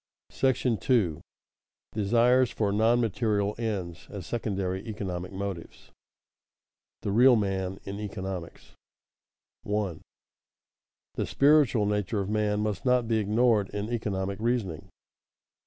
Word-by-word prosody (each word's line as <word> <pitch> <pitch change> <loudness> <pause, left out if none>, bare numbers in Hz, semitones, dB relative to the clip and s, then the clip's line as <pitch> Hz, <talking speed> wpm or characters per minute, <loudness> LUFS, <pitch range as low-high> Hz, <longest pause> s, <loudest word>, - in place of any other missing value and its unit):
§ 125 -4 0
II. 100 - +2 0.7
DESIRES 120 +4 +3
FOR 105 -2 -1
NON 110 +4 +3
MATERIAL 105 -2 0
ENDS, 95 -7 -4
AS 100 -4 -7
SECONDARY 95 -5 -2
ECONOMIC 95 -4 -4
MOTIVES 95 -3 -5
[Sidenote: - - -23 1.1
The 100 - -1
real 125 +4 +6
man 95 -3 -1
in 100 +1 -6
economics] 95 -4 -6 0.9
1. 105 -5 -2 1.2
_The - - 0
spiritual 140 -6 +4
nature 105 0 -1
of 100 +1 -2
man 105 -1 +1
must 105 -1 -2
not 125 -2 +2
be 115 -1 +2
ignored 110 -1 +2
in 105 +3 -4
economic 100 -3 -2
reasoning. 105 -8 -1
105 Hz, 115 wpm, -28 LUFS, 95-115 Hz, 1.2 s, real